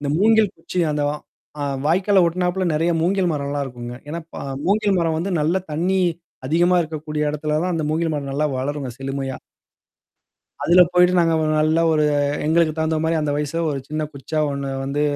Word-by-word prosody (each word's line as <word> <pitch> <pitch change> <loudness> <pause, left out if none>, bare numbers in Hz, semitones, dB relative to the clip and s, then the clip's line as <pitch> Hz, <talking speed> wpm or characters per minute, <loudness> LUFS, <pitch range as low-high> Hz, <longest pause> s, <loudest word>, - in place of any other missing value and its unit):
இந்த 145 - -3
மூங்கில் 220 0 +4
குச்சி 180 - -3
அந்த 150 0 -1
வா - - -2 0.5
ஆ - - 0 0.2
வாய்க்கால 190 +4 +3
ஒட்டுனாப்ல 180 +2 0
நிறைய 165 +3 +1
மூங்கில் 180 +1 +1
மரம்லாம் 140 -1 -2
இருக்குங்க. 120 -2 -7
ஏன்னா, 165 +3 -4
ப - - -7 0.3
மூங்கில் 205 +1 +2
மரம் 165 -2 +1
வந்து 180 +4 -2
நல்ல 160 +5 +1
தண்ணி 175 +5 0 0.5
அதிகமா 175 +5 +3
இருக்கக்கூடிய 155 -1 -4
இடத்துல 150 +1 -1
தான் 180 0 -1
அந்த 160 -2 -1
மூங்கில் 160 +1 0
மரம் 140 -2 -4
நல்லா 150 +2 +1
வளரும்ங்க 135 0 -3
செழுமையா. 135 0 -4 1.3
அதில 175 +4 +6
போயிட்டு 180 0 +5
நாங்க 165 -1 +3
ஒரு 155 - 0
நல்ல 155 +1 +2
ஒரு 155 -1 +3 0.4
எங்களுக்கு 160 0 +3
தகுந்த 160 0 0
மாரி 165 +1 +1
அந்த 150 -1 -1
வயச 150 0 -3 0.2
ஒரு 140 -2 -2
சின்ன 155 +1 -3
குச்சா 140 +3 -4
ஒண்ணு 140 0 -4
வந்து 140 +2 -2
155 Hz, 180 wpm, -21 LUFS, 145-175 Hz, 1.3 s, அதில